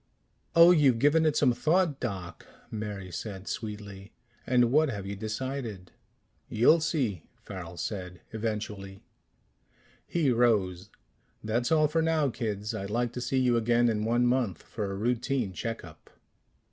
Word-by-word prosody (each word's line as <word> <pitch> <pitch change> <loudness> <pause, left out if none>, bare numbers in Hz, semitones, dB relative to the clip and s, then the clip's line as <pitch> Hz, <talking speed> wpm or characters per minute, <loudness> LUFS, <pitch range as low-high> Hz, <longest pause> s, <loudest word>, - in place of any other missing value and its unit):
"Oh, 170 +1 +9
you've 145 -8 +4
given 150 +5 +4
it 150 - +1
some 130 -4 +4
thought, 160 +2 +1
Doc?" 95 -8 -5 0.2
Mary 105 -4 -5
said 95 +2 -6
sweetly. 105 -2 -6 0.3
"And 125 -1 +3
what 155 +2 +4
have 100 -5 -5
you 100 +1 -4
decided?" 110 -2 -5 0.6
"You'll 125 +9 +5
see," 135 - -1 0.2
Farrel 90 -3 -8
said. 90 -4 -5
"Eventually." 105 -3 -4 1.0
He 160 -6 +1
rose. 105 -6 +1 0.5
"That's 120 +4 -1
all 155 -1 +4
for 165 +2 +1
now, 160 -4 +1
kids. 105 -1 -3
I'd 100 -3 -4
like 120 +2 -1
to 125 - -4
see 130 - -1
you 125 -2 +3
again 120 +1 +3
in 105 -1 -1
one 120 +2 +2
month 120 -8 0
for 105 -3 -4
a 100 - -4
routine 120 -1 -1
check 115 +3 -4
up." 85 - -15
115 Hz, 145 wpm, -28 LUFS, 100-130 Hz, 1.0 s, Oh